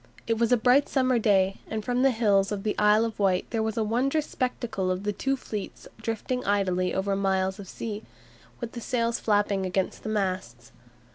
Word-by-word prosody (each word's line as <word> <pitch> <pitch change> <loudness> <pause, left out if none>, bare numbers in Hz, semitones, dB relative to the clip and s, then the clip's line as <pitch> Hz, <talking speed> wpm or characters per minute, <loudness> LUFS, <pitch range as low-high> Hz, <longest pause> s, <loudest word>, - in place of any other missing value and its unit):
It 225 -1 0
was 235 0 +2
a 245 - +6
bright 250 +5 +4
summer 255 -3 +2
day, 195 -3 +3
and 215 -1 -4
from 245 0 +1
the 270 - +5
hills 210 -5 +2
of 200 -2 -3
the 215 - -1
Isle 210 +2 +5
of 225 -2 -5
Wight 190 -3 +2
there 225 -1 0
was 220 +1 -2
a 225 - +2
wondrous 265 +8 +1
spectacle 240 -7 -2
of 185 +1 -1
the 210 0 -1
two 270 +6 -1
fleets 210 -5 -7
drifting 230 +3 -2
idly 185 -2 +1
over 195 +1 0
miles 190 0 0
of 200 - -8
sea, 215 -2 -5 0.6
with 235 -2 -5
the 235 - -7
sails 235 -1 0
flapping 205 -2 +1
against 185 0 -1
the - - -5
masts. 190 -3 -3
215 Hz, 200 wpm, -27 LUFS, 195-235 Hz, 0.6 s, a